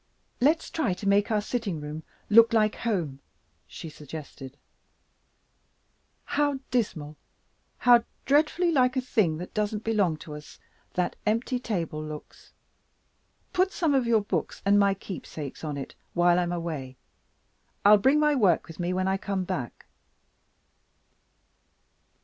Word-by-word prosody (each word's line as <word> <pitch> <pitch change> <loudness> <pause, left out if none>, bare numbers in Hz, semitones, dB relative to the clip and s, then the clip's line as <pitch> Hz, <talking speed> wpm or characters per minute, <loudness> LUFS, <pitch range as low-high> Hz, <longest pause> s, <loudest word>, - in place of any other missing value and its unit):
"Let's 305 +6 +2
try 310 - 0
to 200 - -5
make 200 +1 +3
our 215 -2 +1
sitting 210 -6 -3
room 150 +1 -6 0.3
look 230 +2 +6
like 215 -2 +3
home," 170 - -2 0.5
she - - -9
suggested. 145 -3 -9 1.7
"How 290 -1 +1
dismal, 155 -11 -2 0.6
how 240 -1 +5 0.2
dreadfully 315 +5 +3
like 255 -3 +3
a - - +4
thing 210 -11 +1
that 180 +2 -8
doesn't 210 0 -1
belong 200 -8 +1
to 150 - -8
us, 150 0 -11 0.4
that 180 -1 0
empty 230 +3 0
table 170 -10 -3
looks! 155 -1 -10 1.0
Put 375 +1 +2
some 325 -6 +1
of 260 -3 +2
your 225 -2 +4
books 205 - -3
and 200 +1 +5
my 200 -1 +3
keepsakes 160 -8 -8
on 150 -2 -3
it, 135 - -6 0.2
while 175 0 +4
I - - +2
am 175 0 -2
away. 155 -7 -4 0.9
I'll 210 0 +8
bring 270 +7 +4
my 300 0 +3
work 200 - +3
with 165 0 -11
me 175 +1 -1
when 185 +1 0
I 190 0 +1
come 195 -1 -2
back." 175 -10 -5
200 Hz, 140 wpm, -27 LUFS, 160-235 Hz, 1.7 s, I'll